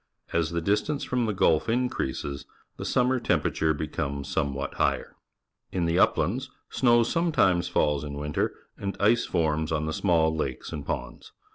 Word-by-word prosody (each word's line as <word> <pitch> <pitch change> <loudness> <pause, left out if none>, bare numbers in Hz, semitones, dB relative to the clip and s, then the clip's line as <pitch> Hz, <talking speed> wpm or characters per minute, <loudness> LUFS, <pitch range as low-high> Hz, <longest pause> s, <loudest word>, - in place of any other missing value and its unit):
As 85 -2 +1
the 85 0 -2
distance 105 - 0
from 125 -2 0
the - - +1
Gulf 85 -2 +2
increases, 110 - -2 0.3
the - - -5
sunmier 125 0 +2
temperature 80 -1 +1
becomes 70 -2 -3
somewhat 70 -2 -2
higher. - - 0 0.6
In 90 -2 0
the 85 +1 +2
uplands - - +2 0.2
snow 120 -2 +4
sometimes 120 - +2
falls 75 -1 +1
in 70 -1 -5
winter, 75 0 -1 0.3
and 100 0 -4
ice 115 +4 +3
forms 80 -2 0
on 80 -1 0
the 80 - -2
small 80 -4 +2
lakes 70 -5 -3
and 75 -3 -4
ponds. 60 -2 -5
80 Hz, 155 wpm, -27 LUFS, 75-110 Hz, 0.6 s, snow